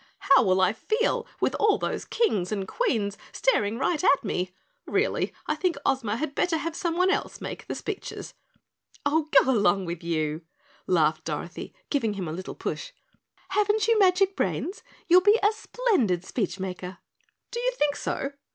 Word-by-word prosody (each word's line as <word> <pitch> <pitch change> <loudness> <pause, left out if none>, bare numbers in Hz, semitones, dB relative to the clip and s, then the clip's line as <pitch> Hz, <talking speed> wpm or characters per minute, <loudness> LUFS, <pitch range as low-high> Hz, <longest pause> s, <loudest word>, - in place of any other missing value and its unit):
"How 390 -2 +5
will 190 -5 +3
I 185 +2 +4
feel 445 - 0
with - - +1
all 425 -1 +4
those - - -3
Kings 210 - 0
and 195 -3 -2
Queens 215 - -1
staring 225 - +1
right 325 +6 0
at 280 - +4
me? 185 -3 -2 0.4
Really, - - 0
I - - 0
think 365 -2 -1
Ozma 235 -6 +1
had 295 +1 -3
better 330 +2 +1
have 330 +1 -4
someone 360 +2 +1
else - - -2
make - - -7
the - - -3
speeches." - - -6 0.7
"Oh, 305 +1 +2
go 265 - +6
along 200 -5 +2
with 170 0 -5
you," 155 -2 -1 0.5
laughed 155 -3 +2
Dorothy, - - -5 0.2
giving 230 -8 +1
him 190 -3 -4
a - - -4
little 185 +3 -6
push. - - -5 0.6
"Haven't 420 +1 +2
you 460 -1 +4
magic 385 0 +4
brains? 380 +1 -2 0.3
You'll 360 +1 +7
be 415 +4 +5
a 415 - +5
splendid 395 - 0
speechmaker." 185 -4 -4 0.5
"Do 475 - -3
you - - +1
think 290 -1 +2
so? 275 -1 -3
280 Hz, 165 wpm, -26 LUFS, -, 0.7 s, You'll